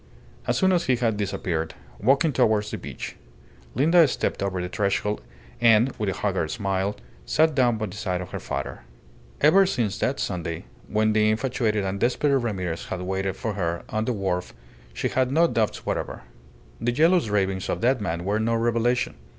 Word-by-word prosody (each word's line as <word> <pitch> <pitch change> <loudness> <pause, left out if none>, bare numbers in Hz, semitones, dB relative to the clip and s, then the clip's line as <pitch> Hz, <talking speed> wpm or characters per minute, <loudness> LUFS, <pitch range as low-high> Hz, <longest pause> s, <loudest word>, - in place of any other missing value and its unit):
As - - +1
soon 190 -1 +3
as 175 -2 +2
he 130 - +3
had 115 -3 0
disappeared, 85 -5 -2 0.2
walking 140 +7 +3
towards 110 -4 +2
the - - -3
beach, - - -7 0.6
Linda 160 +6 +5
stepped - - -2
over 95 -2 -1
the 90 - -2
threshold 105 +2 -1 0.4
and, 115 +2 +5
with 105 -2 0
a 95 - -3
haggard 95 -6 -1
smile, 100 -1 -1 0.3
sat 155 - +3
down 125 -4 +3
by 110 - -2
the 95 - -8
side 95 -4 -2
of 90 - -7
her - - -4
father. - - -4 0.6
Ever 185 +6 +6
since 110 - -1
that 135 - 0
Sunday, 85 -3 -3 0.2
when 110 0 +2
the 110 0 +3
infatuated 110 -2 0
and 95 +1 -2
desperate 135 +5 +2
Ramirez 95 -10 -2
had 95 - -4
waited 95 +1 -2
for 110 - -3
her 85 -4 -2
on 110 0 -1
the 125 - 0
wharf, 95 -4 -2 0.4
she - - -2
had 130 0 +1
no 165 +4 +5
doubts 110 -10 -1
whatever. - - -3 0.6
The 120 - 0
jealous 160 0 +3
ravings 95 -2 0
of - - -1
that 125 0 +2
man 85 -3 -3
were 105 +2 +1
no 115 +1 +1
revelation. 120 -2 +1
110 Hz, 185 wpm, -25 LUFS, 95-125 Hz, 0.6 s, Ever